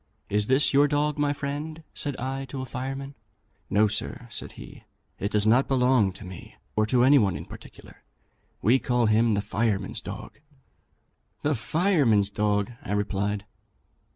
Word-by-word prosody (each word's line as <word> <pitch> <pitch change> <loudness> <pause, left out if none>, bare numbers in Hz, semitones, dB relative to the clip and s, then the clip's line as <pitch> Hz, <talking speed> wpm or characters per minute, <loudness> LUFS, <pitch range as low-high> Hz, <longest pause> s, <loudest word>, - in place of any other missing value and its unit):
'Is 105 +1 +1
this 130 +3 +3
your 145 +1 +5
dog, 150 +1 0
my 145 -1 +2
friend?' 145 +3 -5
said 145 -2 -2
I 135 +2 -3
to 130 0 -6
a - - -4
fireman. 135 +2 -5 0.6
'No, 105 +2 +4
sir,' 105 - -2
answered 120 -1 -8
he; - - -12 0.4
it 100 - -1
does 105 0 +1
not 120 +5 +4
belong 125 -6 +3
to 95 +2 -11
me, 90 -1 -10 0.2
or 110 0 +2
to 120 +2 +3
any 140 +2 +7
one 95 -6 +1
in 80 - -8
particular. - - -13 0.6
We 120 +6 +5
call 125 -2 +1
him 110 0 +3
the 100 - 0
firemen's 105 -2 -1
dog.' - - -8 1.0
'The 150 - +2
firemen's 130 - +2
dog!' 105 +1 0
I - - -4
replied. 100 0 -1
120 Hz, 160 wpm, -26 LUFS, 105-140 Hz, 1.0 s, any